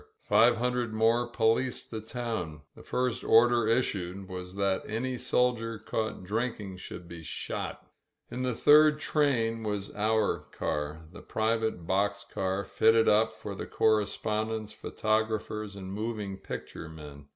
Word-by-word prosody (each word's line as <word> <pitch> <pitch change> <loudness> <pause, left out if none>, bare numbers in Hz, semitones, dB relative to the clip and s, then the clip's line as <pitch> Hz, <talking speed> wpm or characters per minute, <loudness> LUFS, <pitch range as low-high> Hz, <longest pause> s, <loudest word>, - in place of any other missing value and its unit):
Five 115 +3 +5
hundred 125 -1 -1
more 115 +2 +3
policed 120 +2 0
the 110 -1 -4
town. 110 -10 -4
The - - -12
first 125 -2 -1
order 120 0 +5
issued 100 -5 0
was 90 0 -7
that 100 -1 +1
any 125 +4 -2
soldier 125 -2 +1
caught 110 -1 -3
drinking 105 -1 -3
should 90 -1 -9
be 85 -1 -8
shot« 75 -4 -5 0.5
In 125 +1 -4
the 125 -2 0
third 150 +4 +6
train 120 -8 +1
was 105 -2 -3
our 110 0 +1
car 75 +2 -3
— - - -21
^the - - -12
private 110 -5 0
box 100 +3 0
car 95 +1 -1
fitted 110 0 +4
up 110 +2 +4
for - - -7
the - - -6
correspondents, 110 0 0
photographers 110 -1 -1
and 95 -1 -7
moving 105 -2 -3
picture 80 - -7
men. 75 -3 -11
110 Hz, 140 wpm, -29 LUFS, 95-115 Hz, 0.5 s, third